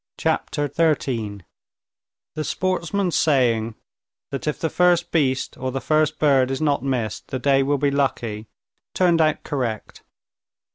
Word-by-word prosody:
Chapter 145 0 -1
13 120 - -1 0.9
The 155 - -3
sportsman's 185 +1 -1
saying, 115 -7 +2 0.6
that 135 +2 -4
if 150 - -1
the 160 - -1
first 175 -1 +2
beast 135 -5 0
or 130 0 -2
the 135 - -2
first 155 +3 +1
bird 135 -4 +3
is 135 - -2
not 145 -2 +1
missed, 125 -6 -2
the 130 - -3
day 135 +1 +3
will 140 +2 +1
be 140 +1 +1
lucky, 115 -6 -1 0.5
turned 175 -3 +3
out 155 -1 +1
correct. 125 -7 -4
140 Hz, 140 wpm, -22 LUFS, 130-155 Hz, 0.9 s, bird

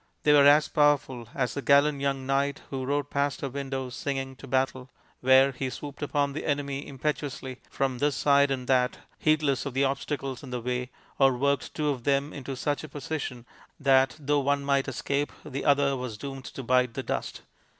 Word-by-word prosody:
They 150 - +5
were 140 -1 +7
as 150 +1 +6
powerful 145 -5 +2
as 125 -3 0
the 140 - -3
gallant 140 +1 +4
young 135 -1 -1
knight 140 +1 0
who 130 -1 -3
rode 145 +1 -1
past 140 0 0
her 140 - -2
window 135 -1 -4
singing 135 0 -3
to 140 - -11
battle, 130 0 -1 0.3
where 130 +1 +5
he 130 0 -3
swooped 145 +2 -8
upon 145 -1 0
the 150 - -4
enemy 140 -1 -2
impetuously 135 -2 -4
from 135 -2 -1
this 145 -1 +1
side 140 +4 +4
and 130 -2 -2
that, 125 -1 +2 0.2
heedless 150 -3 +2
of 135 - -6
the 135 - +3
obstacles 135 -1 -2
in 135 - -10
the 125 0 -3
way, 125 +1 -3 0.3
or 135 -2 +4
worked 140 0 0
two 150 -1 0
of 130 -4 -2
them 140 +2 +1
into 135 -1 -6
such 145 +3 -2
a 155 - -8
position 135 -4 -5 0.3
that, 135 -3 +4
though 145 0 +1
one 140 0 0
might 140 -1 +2
escape, 140 +2 -1
the 140 -2 -4
other 140 -1 +3
was 125 -4 -5
doomed 135 +1 -7
to 135 - -7
bite 125 -1 +2
the - - -3
dust. - - -4
140 Hz, 195 wpm, -27 LUFS, 130-145 Hz, 0.3 s, were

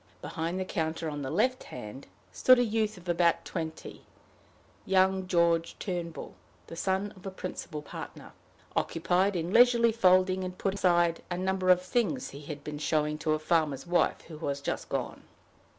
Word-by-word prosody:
Behind 170 +2 -3
the 185 - -2
counter, 165 -3 -2
on 145 0 -5
the 135 - -4
left 245 - +1
hand, 125 +2 -9 0.2
stood 255 0 +5
a 245 - +4
youth 220 -2 -1
of 180 0 -14
about 170 -1 +2
twenty, 160 -3 -6 0.8
young 190 0 +2
George 170 -2 +2
Turnbull, 175 -3 -5 0.3
the - - -9
son 190 +3 -1
of 185 - -15
the 195 - -5
principal 180 -5 -6
partner, - - -9 0.4
occupied 180 +4 +1
in 170 +2 -2
leisurely 235 -1 +6
folding 185 -3 +3
and 180 0 -5
putting 195 0 -2
aside 175 -2 +3
a 175 - -2
number 190 0 0
of 180 0 +5
things 240 +6 -1
he 140 - -9
had 145 -1 -8
been 150 -1 -6
showing 150 0 0
to 155 0 +1
a - - +1
farmer's 155 -3 0
wife, 175 0 +1
who 155 -3 -11
was 140 -3 -2
just 140 - -4
gone. - - -3
175 Hz, 170 wpm, -29 LUFS, 160-190 Hz, 0.8 s, leisurely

